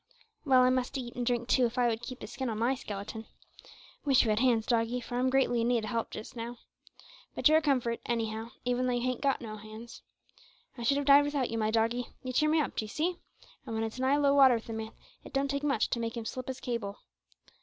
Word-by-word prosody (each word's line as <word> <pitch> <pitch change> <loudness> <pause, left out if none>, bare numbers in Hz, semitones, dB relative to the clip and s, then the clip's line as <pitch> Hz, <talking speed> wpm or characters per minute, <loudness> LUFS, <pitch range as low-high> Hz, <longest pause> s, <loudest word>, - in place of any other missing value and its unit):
Well, 260 -3 +6
I 255 - +4
must 255 +1 -1
eat 240 -2 -6
and 245 - -2
drink 240 -1 0
too, 250 -1 +4
if 230 - -9
I 245 -1 +3
would 225 -1 -1
keep 255 +1 -8
the - - -5
skin 265 -2 -4
on 220 - -3
my 235 +4 +2
skeleton. 220 -3 -6 0.8
Wish 275 -3 +4
you 225 - +1
had 210 - +1
hands, 235 -3 +3
doggie, 235 +1 +1
for 245 0 -4
I'm 260 +1 +2
greatly 255 -3 +2
in 230 - +1
need 240 -3 +1
o' - - -5
help 230 0 -2
just 215 - -8
now. 235 +1 -6 0.8
But - - +4
you're 310 +1 +6
a - - -8
comfort, 255 -6 +1
anyhow, 225 -1 -2 0.2
even 250 +1 +1
though 250 - +1
you 245 - 0
hain't 255 -1 -1
got 275 -2 +1
no 215 -2 -6
hands. 215 +2 -11 0.7
I 240 - -9
should 275 +4 +2
have 285 - -1
died 280 +1 +7
without 285 -4 -1
you, 230 - -2
my 215 0 +1
doggie 230 +2 +1 0.2
you 255 0 -4
cheer 305 +4 +3
me 315 +1 +3
up, 295 - -1
d'ee 215 - -2
see, 335 +10 -1 0.5
and 230 -4 -5
when 220 - -1
it's 225 +3 -5
nigh 265 +2 +3
low 285 -1 +3
water 270 -3 +7
with 230 0 -6
a - - -3
man, 220 0 -5 0.3
it - - -12
don't 275 0 0
take 280 0 -1
much 275 -7 0
to 235 - 0
make 230 0 -3
him 230 - -5
slip 255 +2 -5
his 260 0 -4
cable. 230 -6 -4
245 Hz, 255 wpm, -30 LUFS, 225-265 Hz, 0.8 s, died